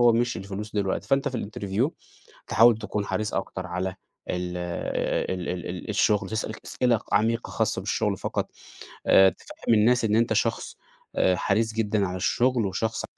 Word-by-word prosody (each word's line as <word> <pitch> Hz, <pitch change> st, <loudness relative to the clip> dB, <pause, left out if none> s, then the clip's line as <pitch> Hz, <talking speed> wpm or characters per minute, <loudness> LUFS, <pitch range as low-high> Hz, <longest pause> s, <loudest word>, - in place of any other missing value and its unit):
هو 120 Hz, -1 st, +6 dB
مش 120 Hz, +1 st, +1 dB
الفلوس 100 Hz, +2 st, -6 dB
دلوقتي. 100 Hz, -2 st, -1 dB
فأنت 135 Hz, 0 st, +2 dB
في 125 Hz, -, -3 dB
الinterview 105 Hz, +5 st, -1 dB, 0.6 s
تحاول 115 Hz, 0 st, +6 dB
تكون 105 Hz, -1 st, -3 dB
حريص 110 Hz, 0 st, -2 dB
أكتر 95 Hz, -1 st, -3 dB
على 90 Hz, +1 st, -3 dB, 0.4 s
ال 90 Hz, 0 st, -3 dB
آآ 90 Hz, +1 st, -2 dB
ال 90 Hz, -1 st, -5 dB
ال 90 Hz, 0 st, -5 dB
الشغل. 105 Hz, -1 st, +2 dB
تسأل 110 Hz, +1 st, -2 dB
أسئلة 120 Hz, -4 st, +1 dB
عميقة 115 Hz, +3 st, +1 dB
خاصة -, -, 0 dB
بالشغل -, -, 0 dB
فقط. -, -, -3 dB, 0.6 s
آآ 95 Hz, 0 st, +7 dB
تفهّم 115 Hz, -, -3 dB
الناس 115 Hz, +2 st, +4 dB
إن 105 Hz, -1 st, +2 dB
أنت 115 Hz, +1 st, +3 dB
شخص -, -, -1 dB, 0.4 s
آآ 90 Hz, -, +3 dB
حريص 110 Hz, +5 st, 0 dB
جدًا 105 Hz, -2 st, +1 dB
على 90 Hz, +1 st, -4 dB
الشغل، 120 Hz, +4 st, +1 dB
وشخص 105 Hz, +4 st, -2 dB
105 Hz, 160 wpm, -26 LUFS, 95-115 Hz, 0.6 s, آآ